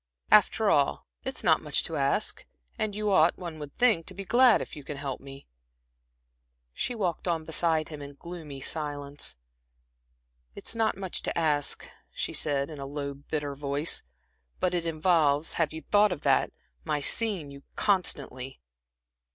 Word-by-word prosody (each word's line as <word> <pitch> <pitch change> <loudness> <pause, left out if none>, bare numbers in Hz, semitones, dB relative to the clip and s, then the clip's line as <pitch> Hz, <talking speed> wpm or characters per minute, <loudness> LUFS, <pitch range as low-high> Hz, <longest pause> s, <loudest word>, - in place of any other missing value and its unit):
"After - - +5
all, - - +2 0.2
it - - -3
is - - 0
not - - +4
much - - +1
to - - -1
ask, - - 0 0.3
and 210 -2 -2
you 210 -1 0
ought, 170 -3 +5
one 170 -4 -7
would 145 -1 -9
think, 220 -10 +3
to 185 - -5
be 195 +1 -6
glad 240 +1 +6
if - - -6
you 145 - -9
can 145 +1 -6
help 140 -2 -4
me." 135 0 -11 1.3
She 245 - -2
walked 185 -5 -2
on 165 -2 0
beside 160 -1 0
him 150 -2 -8
in 140 0 -9
gloomy 155 -4 -8
silence. 145 - -2 1.2
"It's - - -2
not 225 -3 +1
much 190 -2 0
to - - -2
ask," 150 -3 +1 0.2
she - - -3
said, 140 0 +1
in 150 - -8
a 135 - -5
low, 140 0 -4
bitter 145 +1 -4
voice, 140 +2 -1 0.6
"but 180 -1 +1
it 170 -1 0
involves 155 -2 +2
have 155 - +2
you 160 0 -6
thought 205 +2 +4
of 165 - -3
that? - - +3 0.3
my 150 - 0
seeing 185 -2 0
you 140 0 -11
constantly." 140 -9 -1
155 Hz, 170 wpm, -28 LUFS, 140-180 Hz, 1.3 s, glad